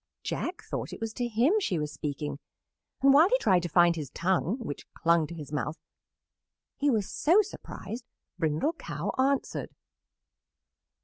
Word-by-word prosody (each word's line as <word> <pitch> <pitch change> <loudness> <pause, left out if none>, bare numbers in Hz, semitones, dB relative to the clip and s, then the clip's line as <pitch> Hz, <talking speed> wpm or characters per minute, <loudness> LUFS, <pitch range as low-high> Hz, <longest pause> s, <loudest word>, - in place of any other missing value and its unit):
Jack 360 - -3
thought - - -4
it - - -7
was 225 -1 -3
to 245 0 -2
him 240 - +3
she 190 - 0
was 150 -1 -3
speaking, 145 -1 -4 0.6
and 275 0 +7
while 315 +6 +7
he - - +4
tried 185 - +3
to 175 - -3
find 170 +1 +5
his 150 -5 -5
tongue, 185 - 0
which 225 - -7
clung 170 -2 +3
to 170 - -8
his 150 -4 -8
mouth, 150 +1 -2 1.0
he 290 - +1
was 215 -6 +1
so 365 +8 +4
surprised, 255 - -8 0.3
Brindle 160 - +1
Cow - - -4
answered. 275 +1 +1
190 Hz, 160 wpm, -29 LUFS, -, 1.0 s, and